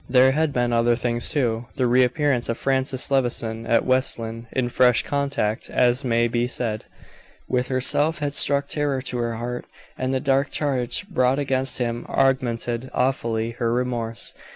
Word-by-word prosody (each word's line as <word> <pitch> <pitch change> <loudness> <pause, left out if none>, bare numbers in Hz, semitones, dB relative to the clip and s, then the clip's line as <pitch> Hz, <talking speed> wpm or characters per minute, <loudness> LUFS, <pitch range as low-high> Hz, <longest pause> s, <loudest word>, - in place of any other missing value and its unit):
There 130 +1 +5
had 155 +2 0
been 120 -2 0
other 120 0 +3
things, 120 0 +1
too. 120 -5 -1
The 130 - +1
re 125 +1 +4
appearance 125 0 0
of 115 - -1
Francis 135 0 -1
Levison 115 -4 -1
at 115 -1 +2
West 130 +1 +1
Lynne, 115 0 -7
in 125 -2 -1
fresh 125 -1 +3
contact, 140 -6 -2
as 125 +2 +2
may 120 -2 +2
be 120 +1 -1
said, 115 -3 -3 0.6
with 125 0 0
herself, 145 +5 +4
had 145 -2 -3
struck 140 0 +3
terror 145 -3 0
to 125 - -3
her 115 -1 -2
heart, 120 +2 -5 0.3
and 130 0 -1
the 130 - 0
dark 135 +1 +1
charge 135 +4 -1
brought 130 -8 +1
against 135 -2 0
him 120 -1 -3
augmented 125 -2 0
awfully 115 -3 -1
her 115 0 -2
remorse. 120 -2 -2
125 Hz, 170 wpm, -23 LUFS, 120-135 Hz, 0.6 s, There